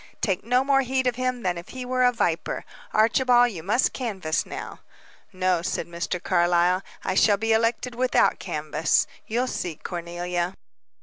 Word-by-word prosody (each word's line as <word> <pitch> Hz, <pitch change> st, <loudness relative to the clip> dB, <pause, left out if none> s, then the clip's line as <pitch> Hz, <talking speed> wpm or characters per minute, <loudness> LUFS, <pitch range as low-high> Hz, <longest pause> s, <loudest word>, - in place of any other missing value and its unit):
Take 195 Hz, -3 st, -1 dB
no 250 Hz, +3 st, +2 dB
more 270 Hz, 0 st, +3 dB
heed 260 Hz, 0 st, -1 dB
of 250 Hz, -2 st, +1 dB
him 255 Hz, -1 st, -2 dB
than 175 Hz, -2 st, -1 dB
if 170 Hz, -, -12 dB
he 255 Hz, -1 st, -6 dB
were 255 Hz, 0 st, +1 dB
a 250 Hz, -, +5 dB
viper. 170 Hz, -9 st, -1 dB, 0.3 s
Archibald, 245 Hz, +2 st, +4 dB
you 175 Hz, -6 st, -7 dB
must 215 Hz, +9 st, +1 dB
canvass 190 Hz, -11 st, -2 dB
now." -, -, -7 dB, 0.5 s
"No," 185 Hz, -2 st, +1 dB
said 175 Hz, -, -2 dB
Mr. 170 Hz, +1 st, -3 dB
Carlyle, 175 Hz, +1 st, +2 dB, 0.2 s
"I -, -, -1 dB
shall 205 Hz, +2 st, +4 dB
be 225 Hz, +2 st, +1 dB
elected 230 Hz, +2 st, +1 dB
without 255 Hz, +1 st, +2 dB
canvass. -, -, 0 dB, 0.2 s
You'll 240 Hz, +3 st, 0 dB
see, 175 Hz, -9 st, -3 dB
Cornelia." 175 Hz, +1 st, -4 dB
215 Hz, 165 wpm, -25 LUFS, 175-250 Hz, 0.5 s, a